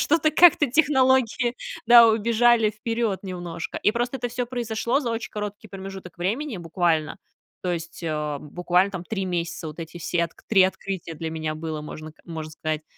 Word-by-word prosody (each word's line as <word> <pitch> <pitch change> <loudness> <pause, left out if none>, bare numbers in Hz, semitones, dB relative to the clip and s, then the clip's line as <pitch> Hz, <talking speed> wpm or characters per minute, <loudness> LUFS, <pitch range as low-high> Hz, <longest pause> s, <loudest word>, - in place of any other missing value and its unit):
что-то 315 0 +3
как-то 315 -1 +6
технологии, 260 -4 +3 0.3
да, 235 0 +9
убежали 225 0 +3
вперёд 225 -1 -2
немножко. 175 -3 -5
И 210 - +3
просто 240 +3 -2
это 245 - -2
всё 245 +1 -3
произошло 235 +1 -1
за 245 -5 -2
очень 230 0 -4
короткий 210 0 -5
промежуток 190 -2 -9
времени, 225 +7 -2
буквально, 165 -2 0 0.5
то 180 - -1
есть, 170 0 -6
э, 150 -3 -2
буквально 180 +6 +1
там 180 -2 -5
3 195 -2 -3
месяца, 170 -2 -3
вот 155 +2 -7
эти 165 +1 -8
все 170 0 0
отк 165 - -11
3 195 -4 +6
открытия 190 -2 -2
для 160 +1 -5
меня 155 -1 -3
было, 155 -1 -4
можно 155 +1 -8
к - - -26
можно 160 -2 -6
сказать. 155 0 -3
190 Hz, 175 wpm, -24 LUFS, 165-235 Hz, 0.5 s, да